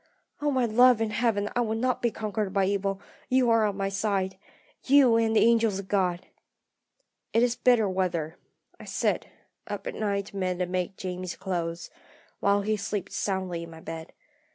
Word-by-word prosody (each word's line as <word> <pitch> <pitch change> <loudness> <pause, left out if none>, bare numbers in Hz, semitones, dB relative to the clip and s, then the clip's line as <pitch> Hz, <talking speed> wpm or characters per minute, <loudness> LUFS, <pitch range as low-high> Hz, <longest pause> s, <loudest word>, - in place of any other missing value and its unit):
Oh, 295 - +1
my 260 -3 +2
love 245 +1 +5
in 225 -1 -1
heaven, 215 -2 +1
I 245 - +2
will 220 -2 -1
not 250 +2 0
be 240 - +2
conquered 215 -2 -3
by 195 0 +2
evil; 195 0 -1 0.3
you 255 -2 +3
are 225 -2 +4
on 200 -1 -3
my 195 -1 -1
side 195 -1 -1 0.5
you, 265 -4 +5
and 225 -1 +2
the - - +5
angels 230 -3 +3
of 195 -1 -6
God! 185 -2 0 1.1
"It 230 - +4
is 245 -1 +2
bitter 240 -5 +3
weather. 175 -4 -1 0.4
I - - -10
sit, - - -1 0.4
up - - -5
at - - -4
night 200 -2 -1
to 200 - -10
mend 185 -2 -1
and 180 -1 -2
make 185 +1 -2
Jamie's 185 -1 -5
clothes, 170 -3 -4 0.5
while 200 0 +3
he 215 +1 0
sleeps 200 -1 -4
soundly 185 -3 -2
in 170 - -8
my 160 0 -11
bed. 160 0 -8
200 Hz, 185 wpm, -27 LUFS, 185-225 Hz, 1.1 s, love